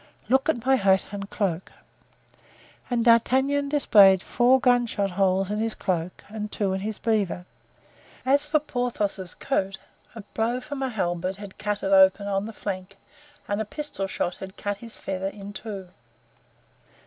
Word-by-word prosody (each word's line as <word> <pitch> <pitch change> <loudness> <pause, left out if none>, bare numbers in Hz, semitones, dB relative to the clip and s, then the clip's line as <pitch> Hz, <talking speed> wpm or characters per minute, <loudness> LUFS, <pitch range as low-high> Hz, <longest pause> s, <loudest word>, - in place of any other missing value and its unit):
"Look 265 +4 +3
at 240 -6 0
my 265 0 +4
hat 190 -3 +2
and 200 -1 -6
cloak." 185 -4 -2 1.2
And 240 -1 0
D'Artagnan 265 +5 +3
displayed 200 -10 +6
four 250 +2 +4
gunshot 240 -6 +2
holes 190 +1 +1
in 210 - -1
his 225 0 -1
cloak 180 -2 -2
and 210 0 -6
two 195 -3 -1
in 190 - -1
his 210 +2 -4
beaver. 205 -6 0 0.8
As 285 +3 +3
for 305 +1 +3
Porthos's 225 - -3
coat, 195 -7 -1 0.4
a 225 - -7
blow 230 +3 0
from 280 +1 -6
a 265 - 0
halberd 185 -4 -2
had 200 -1 -11
cut 210 0 -2
it 195 0 +1
open 190 +1 +6
on 200 +1 -1
the - - -6
flank 195 -2 -6 0.5
and 205 +1 -1
a - - +1
pistol 290 -4 -4
shot 175 -2 -2
had 190 0 -9
cut 205 -1 -3
his 230 +2 -6
feather 190 0 -3
in 200 0 -8
two. 200 -3 -7
205 Hz, 160 wpm, -25 LUFS, 195-240 Hz, 1.2 s, displayed